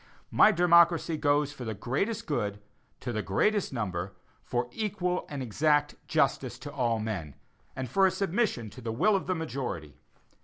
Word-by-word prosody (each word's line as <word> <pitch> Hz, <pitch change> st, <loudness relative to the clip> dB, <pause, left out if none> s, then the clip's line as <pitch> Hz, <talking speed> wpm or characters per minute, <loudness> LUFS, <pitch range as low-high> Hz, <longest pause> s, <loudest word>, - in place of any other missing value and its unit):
My 215 Hz, -, +6 dB
democracy 170 Hz, -2 st, +4 dB
goes 145 Hz, -1 st, +1 dB
for 125 Hz, -, -8 dB
the 110 Hz, -2 st, -4 dB
greatest 195 Hz, -, -2 dB
good 105 Hz, -9 st, -2 dB, 0.4 s
to 120 Hz, -, -4 dB
the 110 Hz, -, -1 dB
greatest 200 Hz, -, +1 dB
number, 100 Hz, -6 st, -3 dB, 0.3 s
for 120 Hz, 0 st, -2 dB
equal 190 Hz, -4 st, -2 dB
and 140 Hz, -3 st, -4 dB
exact 145 Hz, +5 st, +2 dB
justice -, -, +1 dB
to 145 Hz, -1 st, -9 dB
all 120 Hz, -5 st, +1 dB
men, 100 Hz, -10 st, -4 dB, 0.4 s
and 130 Hz, 0 st, -3 dB
for 190 Hz, +10 st, +4 dB
a -, -, +3 dB
submission 190 Hz, -, -1 dB
to 130 Hz, -, -11 dB
the 115 Hz, -1 st, -3 dB
will 200 Hz, -, +3 dB
of 195 Hz, -, -2 dB
the 185 Hz, -, +1 dB
majority. 130 Hz, -, -4 dB
145 Hz, 165 wpm, -29 LUFS, 110-180 Hz, 0.4 s, My